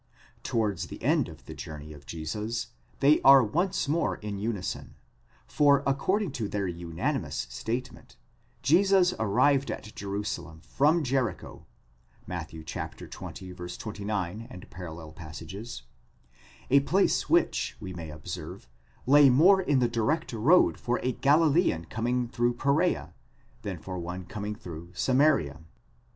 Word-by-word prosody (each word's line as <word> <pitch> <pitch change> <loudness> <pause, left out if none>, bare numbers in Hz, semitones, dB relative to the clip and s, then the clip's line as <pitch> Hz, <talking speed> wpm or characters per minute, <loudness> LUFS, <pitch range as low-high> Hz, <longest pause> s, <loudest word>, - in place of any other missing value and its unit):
'Towards 100 -7 -1
the - - -9
end - - +2
of - - -13
the - - -8
journey 75 0 -8
of 75 -1 -15
Jesus, 105 +9 -4 0.3
they 145 +2 +5
are 135 -1 +8
once 165 - 0
more 160 +4 +1
in 105 -2 -6
unison, 105 -3 -4 0.5
for 140 -1 +4
according 170 +8 +1
to 115 -6 -3
their 100 -1 -1
—_— 85 -2 -3 0.2
statement, 120 - -5 0.5
Jesus 185 +2 +4
arrived 135 +6 +3
at 105 - -6
Jerusalem 100 -5 -5
from 150 - +2
Jericho 125 -8 -2 0.6
(Matt. - - -5
xx. 80 0 -7 0.7
29, 105 0 -4 0.2
parall.); 80 -3 -8 1.7
place 190 +7 +2
which, - - +2
we 95 - -7
may 85 -2 -7
observe, 75 -4 -7 0.4
lay 145 +1 +7
more 180 +10 +6
in 145 -7 +2
the 125 -2 +3
direct 120 +7 -1
road 140 +12 +4
for 120 0 -1
a 130 - +1
Galilean 145 - +3
com: 115 +1 -2
ing 125 0 +1
through 120 +1 0
Pereea, 145 +8 +1 0.5
than - - -4
for 95 -1 -6
one 90 +2 -5
coming 105 +3 -5
through 85 -6 -9
Samaria. 130 - +2
115 Hz, 125 wpm, -28 LUFS, 90-140 Hz, 1.7 s, are